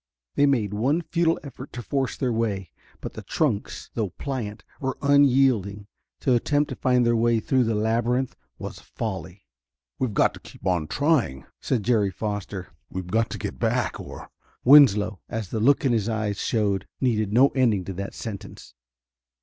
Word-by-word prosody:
They 145 - +4
made 110 -7 +1
one 135 +11 +1
futile 165 0 +1
effort 140 -4 -9
to 120 +1 -6
force 135 0 -1
their 125 -3 0
way, 100 -7 -2 0.3
but - - -6
the - - -7
trunks, 125 -10 -2
though 110 -4 -1
pliant, 110 -2 -5 0.2
were 130 -1 -2
unyielding. 130 -8 +3 0.4
To 130 - +2
attempt 145 +5 +1
to - - -4
find 125 -3 +2
their 120 0 +3
way 115 0 +3
through 130 +3 +2
the 110 -1 0
labyrinth 120 +4 0 0.2
was - - -7
folly. 95 -3 -6 0.5
"We've 120 -6 -1
got - - +3
to - - -11
keep - - -14
on 90 -5 +1
trying," 140 - +1
said 120 -5 -1
Jerry 110 -4 +2
Foster. 100 -1 -5 0.2
"We've 95 0 -5
got 115 +1 +2
to - - -5
get 65 - -5
back, - - 0
or...." - - -9 0.3
Winslow, 115 -8 +6
as 110 -4 -4
the 110 - -2
look 140 +6 +3
in 130 - +3
his 110 -1 0
eyes 110 -2 -2
showed, 100 -4 0
needed 110 -5 +1
no 130 +5 +6
ending 115 -9 +1
to 95 - -5
that 100 +2 -6
sentence. 105 -4 -8
115 Hz, 175 wpm, -25 LUFS, 100-130 Hz, 0.5 s, Winslow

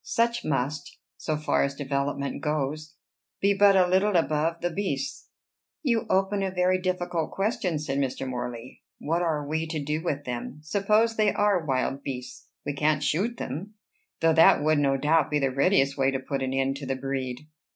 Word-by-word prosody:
Such 235 0 0
must, 145 +1 -2 0.2
so 155 -1 -2
far 150 - +1
as 140 0 0
development 140 0 -2
goes, 150 0 -2 0.4
be 200 +1 +3
but 200 0 +5
a 185 -1 +5
little 190 +3 +2
above 165 0 +1
the 175 - -1
beasts." 145 -7 -3 0.5
"You 235 -6 +1
open 195 +1 +1
a 195 - 0
very 185 0 +1
difficult 180 -3 -1
question," 195 -5 -1
said 145 -2 -2
Mr. 135 -1 -2
Morley: 120 -1 -6 0.2
"What 165 +3 -1
are 155 -4 -1
we 160 +2 -1
to 160 -1 -3
do 150 +2 -2
with 145 -4 -3
them? 125 +3 -5
Supposing 210 +6 +2
they 210 -2 +3
are 205 -4 +2
wild 135 +1 0
beasts, 125 -2 -7 0.2
we 145 - -2
can't 150 +1 +1
shoot 200 +12 0
them; 185 - -6 0.5
though 165 0 +4
that 160 -2 +6
would, 155 0 +3
no 135 -1 +2
doubt, 150 +2 +2
be 150 - +1
the 135 -2 +1
readiest 140 -1 +2
way 135 0 +3
to 135 -1 -1
put 135 +1 -4
an 130 0 -1
end 135 +1 0
to 140 -1 -7
the 135 - -1
breed." 130 0 -4
150 Hz, 185 wpm, -26 LUFS, 135-185 Hz, 0.5 s, that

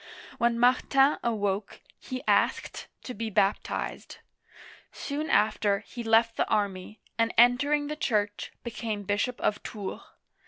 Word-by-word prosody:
When 235 0 +2
Martin 270 +3 +3
awoke, 205 -3 -2 0.2
he 255 0 -6
asked - - +1 0.2
to 250 - -6
be 225 +1 -4
baptized; 195 0 -1 0.7
soon 300 +2 -4
after, 210 -1 +2
he 245 - -8
left 225 0 +3
the - - 0
army, 200 0 -2 0.2
and 230 0 +2
entering 285 +5 +4
the 300 +1 -4
Church, 205 -8 -1
became 225 -3 -4
bishop 205 +5 -1
of 205 - 0
Tours 205 -3 -6
(toor). - - -18
225 Hz, 130 wpm, -28 LUFS, 205-250 Hz, 0.7 s, entering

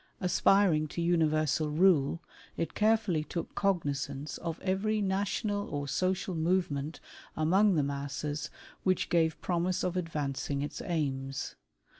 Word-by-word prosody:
Aspiring 180 -3 +3
to 160 - -6
universal 155 -3 +2
rule, 165 -1 +3 0.3
it 165 -1 -2
carefully 210 -7 +2
took 170 +2 -5
cognizance 145 -7 -1
of 165 -1 -4
every 200 +3 0
national 205 +1 -1
or 145 -1 -3
social 185 +4 0
movement 160 -3 0 0.4
among 190 +6 +4
the 150 - +2
masses, 140 +1 -3 0.3
which 185 -2 +1
gave 160 -2 +2
promise 180 0 0
of 180 0 -1
advancing 145 -5 -2
its 145 - -5
aims. 135 -6 -2
165 Hz, 120 wpm, -30 LUFS, 145-185 Hz, 0.4 s, among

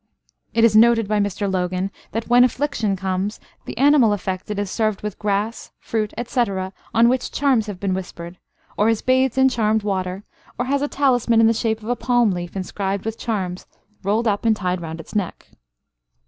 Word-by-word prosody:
It 230 - +3
is 225 -2 +5
noted 225 -1 +5
by 210 0 +1
Mr 205 0 -1
Logan 185 0 -1 0.2
that 225 +1 -3
"when 245 +1 +6
affliction 250 -5 0
comes, 190 +2 -2 0.3
the - - -7
animal 270 -5 +5
affected 190 +1 -4
is 205 -2 -2
served 215 -3 -1
with 210 -2 -5
grass, 210 +2 -2
fruit, 215 -2 -2
etc., 200 -6 -1 0.2
on 230 +1 +5
which 255 +1 0
charms 260 -6 +1
have 200 -3 -6
been 195 -1 -1
whispered, 180 -1 -7 0.4
or 210 +2 +3
is 225 -2 0
bathed 260 0 +2
in 265 0 +6
charmed 220 -4 +1
water, 190 -1 -2 0.3
or 245 - -1
has 280 +2 0
a 290 - 0
talisman 245 -5 +2
in 225 - +6
the 225 - +4
shape 220 -1 -1
of 220 - -6
a 245 - +1
palm 240 -2 +2
leaf 175 0 -5
inscribed 195 +1 -3
with 225 0 -4
charms 190 -6 -3 0.3
rolled 215 +4 0
up 205 -1 0
and 225 -1 +3
tied 185 -3 -2
round 165 0 -6
its 165 - -11
neck." 200 -5 -3
215 Hz, 190 wpm, -21 LUFS, 190-235 Hz, 0.4 s, when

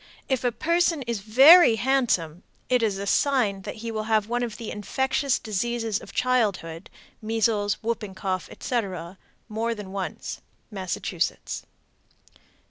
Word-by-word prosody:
If 265 -4 0
a 245 - +2
person 335 +2 +1
is 235 -3 -3
very 265 - +8
handsome, 220 - +1 0.3
it 250 -1 +3
is 210 -4 0
a 200 - -4
sign 215 -4 +2
that 205 - -6
he 230 - -2
will 215 -1 -3
have 215 -2 +2
one 240 +1 -1
of 230 -3 -3
the 230 -2 -6
infectious 265 +5 0
diseases 225 0 -2
of - - -12
childhood 200 -9 0 0.3
(measles, 215 -2 +1
whooping 215 -4 -3
cough, 185 -1 -3
etc.) 190 -6 -4 0.3
more 230 +1 -2
than 205 -3 -8
once. 195 -2 -5 0.3
_Massachusetts. 190 -3 -3
225 Hz, 135 wpm, -25 LUFS, 200-245 Hz, 0.3 s, very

